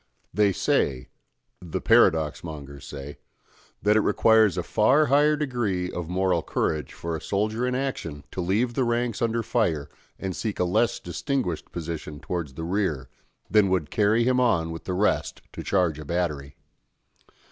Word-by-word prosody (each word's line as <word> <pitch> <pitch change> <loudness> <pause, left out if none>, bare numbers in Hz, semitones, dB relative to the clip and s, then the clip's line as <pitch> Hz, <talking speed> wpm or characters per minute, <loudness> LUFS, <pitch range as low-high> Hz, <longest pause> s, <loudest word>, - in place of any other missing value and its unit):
They 105 +2 +3
say 65 -7 0 0.5
the 85 -3 -4
paradox 80 -2 +3
mongers 70 -4 -8
say 70 0 -8 0.6
that 105 +1 +4
it - - +5
requires 110 -2 +4
a 90 - -1
far 130 - +3
higher 150 +2 +4
degree 115 -11 -1
of 85 -2 -5
moral 90 -1 +1
courage 75 -1 -2
for 85 -1 -4
a 80 - -5
soldier 110 +5 -1
in 125 - -1
action 85 - -3
to 95 - -3
leave 105 +7 +1
the 130 - +1
ranks 120 -1 -1
under 115 0 0
fire 85 -14 0 0.3
and 95 -2 -4
seek 110 -3 -3
a - - +3
less 95 +6 +1
distinguished 90 - -3
position 80 -3 -6
towards 80 -3 -4
the 80 - -5
rear, 85 -7 -1 0.4
than 105 0 +4
would 90 -6 0
carry 110 +2 +3
him 125 +1 +2
on 85 -10 +2
with 80 - -8
the 90 - -2
rest 105 +3 0
to - - -6
charge 90 -6 +1
a 75 - -8
battery. 75 -4 -2
95 Hz, 165 wpm, -25 LUFS, 80-115 Hz, 0.6 s, it